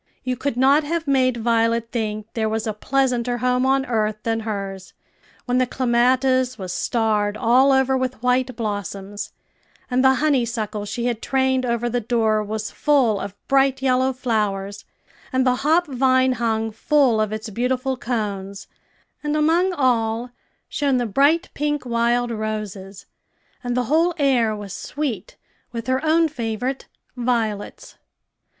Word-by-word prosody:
You 255 Hz, -1 st, -1 dB
could 260 Hz, -1 st, -3 dB
not 275 Hz, +4 st, +4 dB
have 330 Hz, +1 st, -3 dB
made 255 Hz, -3 st, +2 dB
Violet 230 Hz, 0 st, +1 dB
think 215 Hz, -2 st, -3 dB
there 220 Hz, -1 st, -1 dB
was 220 Hz, +1 st, -2 dB
a 220 Hz, -, -2 dB
pleasanter 245 Hz, +1 st, 0 dB
home 250 Hz, +1 st, +1 dB
on 270 Hz, 0 st, +2 dB
earth 215 Hz, -3 st, 0 dB
than 225 Hz, 0 st, 0 dB
hers, 195 Hz, -3 st, -5 dB, 0.5 s
when 250 Hz, 0 st, +1 dB
the 255 Hz, -, +2 dB
clematis 255 Hz, +1 st, +2 dB
was 185 Hz, -2 st, -5 dB
starred 215 Hz, -3 st, 0 dB
all 255 Hz, +4 st, +4 dB
over 265 Hz, 0 st, +3 dB
with 255 Hz, -2 st, -3 dB
white 250 Hz, 0 st, +1 dB
blossoms, 205 Hz, -2 st, -5 dB, 0.6 s
and 255 Hz, +1 st, +2 dB
the 265 Hz, 0 st, +5 dB
honeysuckle 235 Hz, -7 st, 0 dB
she 235 Hz, +3 st, -4 dB
had 240 Hz, -2 st, -1 dB
trained 260 Hz, -1 st, +1 dB
over 235 Hz, 0 st, 0 dB
the 240 Hz, 0 st, -1 dB
door 220 Hz, -2 st, +1 dB
was 215 Hz, +1 st, -4 dB
full 260 Hz, -9 st, +2 dB
of 200 Hz, 0 st, -6 dB
bright 270 Hz, -1 st, +2 dB
yellow 260 Hz, 0 st, +2 dB
flowers, 210 Hz, -6 st, -2 dB, 0.5 s
and 260 Hz, -1 st, +1 dB
the 250 Hz, -1 st, +2 dB
hop 320 Hz, +6 st, +2 dB
vine 260 Hz, -2 st, +2 dB
hung 225 Hz, -2 st, -1 dB
full 250 Hz, 0 st, +2 dB
of 215 Hz, -1 st, -1 dB
its 215 Hz, +1 st, -5 dB
beautiful 255 Hz, +4 st, -1 dB
cones, 205 Hz, -5 st, -4 dB, 0.6 s
and 295 Hz, 0 st, 0 dB
among 335 Hz, +5 st, +3 dB
all 240 Hz, -5 st, 0 dB, 0.4 s
shone 280 Hz, -3 st, 0 dB
the 245 Hz, -, 0 dB
bright 285 Hz, -, +2 dB
pink 295 Hz, -1 st, -2 dB
wild 240 Hz, 0 st, +1 dB
roses, 215 Hz, -3 st, -5 dB, 0.6 s
and 245 Hz, 0 st, -2 dB
the 250 Hz, -, +2 dB
whole 325 Hz, +7 st, +2 dB
air 250 Hz, -7 st, +2 dB
was 205 Hz, -2 st, -7 dB
sweet 255 Hz, -10 st, -4 dB, 0.3 s
with 230 Hz, -1 st, -5 dB
her 260 Hz, +3 st, 0 dB
own 325 Hz, +1 st, +3 dB
favorite 250 Hz, -1 st, -4 dB, 0.3 s
violets. 230 Hz, -4 st, -2 dB
245 Hz, 150 wpm, -22 LUFS, 220-265 Hz, 0.6 s, the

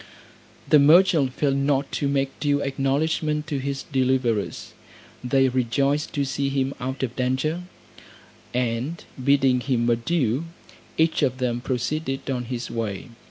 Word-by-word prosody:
The 150 Hz, -, +6 dB
merchant 155 Hz, -2 st, +5 dB
failed 140 Hz, -2 st, +1 dB
not 140 Hz, 0 st, 0 dB
to 140 Hz, -, -1 dB
make 135 Hz, -1 st, -1 dB
due 145 Hz, -1 st, +1 dB
acknowledgment 150 Hz, +3 st, 0 dB
to 150 Hz, -3 st, -3 dB
his 135 Hz, 0 st, -3 dB
deliverers. 130 Hz, -6 st, -1 dB, 0.5 s
They 135 Hz, +2 st, +3 dB
rejoiced 135 Hz, +4 st, 0 dB
to 140 Hz, -1 st, 0 dB
see 140 Hz, +1 st, -1 dB
him 135 Hz, 0 st, -1 dB
out 130 Hz, +2 st, -4 dB
of 125 Hz, -2 st, -3 dB
danger; 135 Hz, +7 st, -1 dB, 0.9 s
and 125 Hz, +6 st, -2 dB, 0.2 s
bidding 135 Hz, -2 st, +4 dB
him 125 Hz, -2 st, 0 dB
adieu, 125 Hz, +3 st, +1 dB, 0.5 s
each 160 Hz, 0 st, +2 dB
of 130 Hz, -3 st, +1 dB
them 120 Hz, -2 st, -1 dB
proceeded 135 Hz, +2 st, -2 dB
on 125 Hz, -2 st, -2 dB
his 120 Hz, 0 st, -5 dB
way. 110 Hz, -2 st, -4 dB
135 Hz, 135 wpm, -24 LUFS, 125-145 Hz, 0.9 s, The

